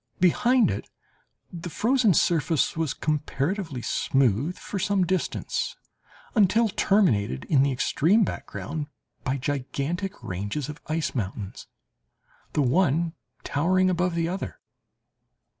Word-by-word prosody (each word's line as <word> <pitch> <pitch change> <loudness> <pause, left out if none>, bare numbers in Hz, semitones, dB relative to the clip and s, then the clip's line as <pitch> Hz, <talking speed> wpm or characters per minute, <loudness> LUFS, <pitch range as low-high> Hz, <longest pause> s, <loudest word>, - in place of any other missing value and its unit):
Behind 235 +7 +4
it - - -5 0.6
the 175 0 -6
frozen 225 - +3
surface 165 -1 +2
was 160 -3 0
comparatively 150 - -2
smooth 135 - +1
for 200 - -5
some 195 -1 +2
distance, 185 +1 -2 0.6
until 220 +1 +4
terminated 120 - +2
in 140 -4 +3
the 140 0 +3
extreme 165 - +3
background 150 -5 -4 0.4
by 135 +1 0
gigantic 145 +7 -2
ranges 100 +10 -3
of 150 - -8
ice 160 0 -1
mountains, 100 -3 -5 0.9
the 150 - +2
one 165 +3 +2 0.3
towering 185 +5 +2
above 180 0 0
the 165 -1 +1
other. 185 +3 -4
165 Hz, 110 wpm, -26 LUFS, 140-185 Hz, 0.9 s, Behind